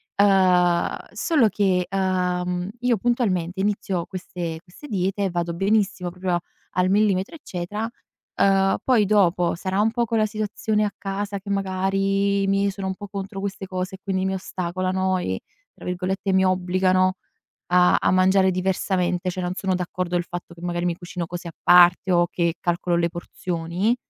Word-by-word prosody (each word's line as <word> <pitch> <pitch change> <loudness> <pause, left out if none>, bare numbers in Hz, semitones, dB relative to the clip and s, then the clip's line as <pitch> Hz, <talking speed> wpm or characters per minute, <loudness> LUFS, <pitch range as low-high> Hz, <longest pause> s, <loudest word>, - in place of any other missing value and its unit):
Uhm, 185 -3 +4 0.2
solo 285 -10 +2
che, 185 -3 +1
uhm, 180 -1 -1
io, 245 -2 +2
puntualmente, 190 -6 0
inizio 195 -3 -1
queste 175 -3 -5
queste 190 +11 -13
diete 195 -2 -1
e - - 0
vado 170 -1 -2
benissimo, 195 0 +1
proprio 180 -1 -1 0.3
al 180 +1 +1
millimetro, 200 - +2
eccetera, 210 - -4 0.5
uhm, 195 0 +3
poi, 235 -6 +3
dopo, 180 -4 +3
sarà 190 +3 -1
un 220 +1 +2
po' 235 0 0
quella 220 -1 +1
situazione 215 0 -1
a 205 - -2
casa, 200 +1 -4
che, 200 +1 -10
magari, 195 +1 +1
i - - 0
miei 195 0 +2
sono 195 0 -5
un 190 - -2
po' 205 +1 -8
contro 195 0 -5
queste 195 -1 -4
cose 185 0 -4
e 190 - -14
quindi 190 -1 -1
mi 190 0 0
ostacolano 185 +1 -1
e 95 - -3 0.3
tra - - -16
virgolette 185 +2 -2
"mi 190 0 +4
obbligano" 185 0 +2 0.5
a 180 0 +5
a - - +2
mangiare 190 +1 +4
diversamente. 185 -1 0
Cioè 180 +1 -4
non 180 0 -2
sono 190 -2 0
d'accordo, 180 0 -3
il 175 - -1
fatto 175 -1 -7
che, 170 - -14
magari, 175 0 -2
mi 175 -1 0
cucino 175 -1 -6
così 175 +1 -7
a - - -6
parte 180 +1 +6
o 175 -1 +4
che 170 -1 0
calcolo 175 0 0
le 170 0 +1
porzioni, 175 +4 -2
185 Hz, 170 wpm, -23 LUFS, 180-200 Hz, 0.5 s, parte